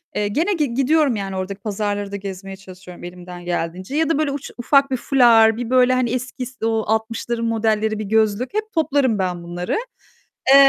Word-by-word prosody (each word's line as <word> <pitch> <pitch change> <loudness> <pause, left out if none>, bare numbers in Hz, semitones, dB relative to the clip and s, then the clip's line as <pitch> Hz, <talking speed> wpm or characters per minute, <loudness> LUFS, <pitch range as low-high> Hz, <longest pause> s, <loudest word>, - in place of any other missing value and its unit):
Eee, 205 0 0
gene 320 - 0
gi 300 -9 -1
gidiyorum 275 +1 +3
yani 195 -2 -4
oradaki 190 +2 -5
pazarları 205 -1 -2
da - - -4
gezmeye 195 -1 -6
çalışıyorum 185 -2 -12
elimden 175 0 -9
geldiğince. 175 +6 -3
Ya 320 0 +2
da 325 - +2
böyle 305 -2 +1
uç, 280 0 -6
ufak 275 +2 +3
bir 260 - +1
fular, 235 -4 +5
bir 240 -1 -4
böyle 255 0 +4
hani 255 -2 +1
eski 255 +1 -4
s 245 -2 -6
o 225 -1 +1
60'ların 230 +2 -1
modelleri 220 -1 0
bir - - -2
gözlük, 220 - +1
hep 430 +1 -2
toplarım 280 - +1
ben 180 -2 -2
bunları. 175 - -3 0.8
Eee, - - +10
220 Hz, 190 wpm, -21 LUFS, 195-255 Hz, 0.8 s, Eee